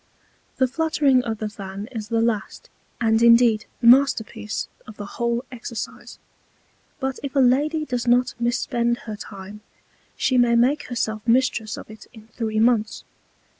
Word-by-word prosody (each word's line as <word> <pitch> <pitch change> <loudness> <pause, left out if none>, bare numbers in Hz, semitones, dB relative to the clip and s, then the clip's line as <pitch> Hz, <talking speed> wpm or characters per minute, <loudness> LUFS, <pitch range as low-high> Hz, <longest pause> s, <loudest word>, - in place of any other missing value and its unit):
The 260 - +3
Fluttering 280 -2 +2
of 225 -2 -3
the 215 - -3
Fan 200 0 -8
is 220 -4 -6
the 230 0 0
last, 230 - -3 0.3
and 225 -1 +2
indeed 235 -2 +5
the - - -2
Masterpiece 235 -4 +3 0.2
of 215 - -11
the 205 - -6
whole 235 +4 -2
Exercise; 235 -2 -7 0.8
but 265 -1 -3
if 280 0 -6
a - - +3
Lady 290 +5 +2
does 245 -3 -3
not 250 +1 +3
mis 240 +1 +1
spend 240 -2 0
her 215 -2 -5
Time, 200 0 -10 0.6
she 255 -2 +2
may 240 -1 +4
make 265 +6 +2
herself 220 -3 -2
Mistress 235 -2 +1
of - - -9
it 215 - -13
in 220 -1 -15
three 220 -1 -3
Months. 225 -2 +1
235 Hz, 160 wpm, -23 LUFS, 220-255 Hz, 0.8 s, indeed